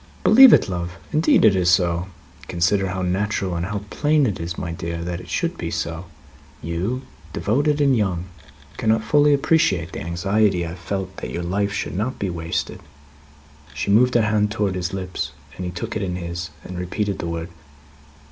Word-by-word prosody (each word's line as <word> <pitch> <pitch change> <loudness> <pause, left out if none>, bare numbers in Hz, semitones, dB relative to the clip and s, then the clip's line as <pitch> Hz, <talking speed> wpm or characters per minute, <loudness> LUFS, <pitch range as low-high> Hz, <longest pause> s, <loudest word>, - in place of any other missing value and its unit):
"Believe 260 +2 +9
it, - - +5
love! 85 -2 -4 0.2
Indeed 155 -5 +4
it 105 -3 +6
is 90 -2 +2
so. 85 0 +2 0.4
Consider 90 +3 +1
how 95 0 -3
natural 95 0 -1
and 85 +1 -2
how 105 0 -4
plain 150 -1 +2
it 105 -6 -2
is, 85 +1 -4
my 85 -2 -4
dear, 85 0 -4
that 85 0 -4
it - - -13
should - - -2
be - - -3
so. 85 +2 -3 0.6
You, 95 - -2 0.3
devoted 145 +7 +1
and 140 -2 +4
young, 95 -6 0 0.5
cannot 110 0 +2
fully 145 +5 +4
appreciate 135 - +2
the - - -6
anxiety 90 +2 +1
I - - -5
have 85 +2 -8
felt 95 +1 -4
that - - -5
your 85 - -4
life 100 +3 0
should 95 - -3
not 115 +7 -2
be 95 -2 -2
wasted 85 -1 -3 0.5
" 70 0 -25
She - - -1
moved 125 +5 +4
her 120 - +5
hand 105 -1 +2
towards 105 -3 -1
his 90 0 -2
lips, 90 -7 -4 0.2
but 95 - -6
he 90 - -3
took 90 - -5
it 110 - -1
in 90 -2 -2
his, 85 -1 -5
and 90 -1 -7
repeated 100 +2 -2
the 85 - -3
word. 85 0 -4
95 Hz, 195 wpm, -22 LUFS, 85-105 Hz, 0.6 s, Believe